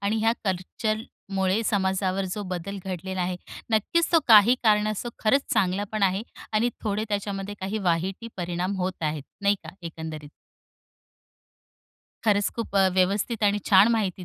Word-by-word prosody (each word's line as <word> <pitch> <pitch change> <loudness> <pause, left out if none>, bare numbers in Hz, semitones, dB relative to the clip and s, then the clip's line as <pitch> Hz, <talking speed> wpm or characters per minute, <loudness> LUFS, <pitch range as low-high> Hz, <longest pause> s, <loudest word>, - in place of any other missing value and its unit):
आणि 200 +2 0
ह्या 225 +1 +3
कल्चरमुळे 195 +1 -2
समाजावर 190 -1 0
जो 210 - -4
बदल 195 +3 -5
घडलेला 190 0 -4
आहे. 180 0 -1 0.3
नक्कीच 225 +10 +2
तो 330 - +6
काही 220 +2 +8
कारणास्तव 215 +1 +2
तो 235 - -11
खरंच 275 +6 +4
चांगला 195 -2 +1
पण 215 -1 -2
आहे 190 +1 +2 0.3
आणि 225 +3 +2
थोडे 215 0 -1
त्याच्यामध्ये 200 -1 -3
काही 195 +3 -2
वाईट 180 0 0
ही 230 - -6
परिणाम 180 +2 -2
होत 185 -1 -3
आहेत. 150 -1 -1 0.2
नाही 200 0 +4
का? - - -9
एकंदरीत. 160 -2 -7 2.0
खरंच 205 -1 +3
खूप 230 -3 -5
अ, 190 -1 +5
व्यवस्थित 200 +5 +1
आणि 205 0 +3
छान 195 +2 +7
माहिती 195 -5 -1
200 Hz, 150 wpm, -26 LUFS, 185-215 Hz, 2.0 s, काही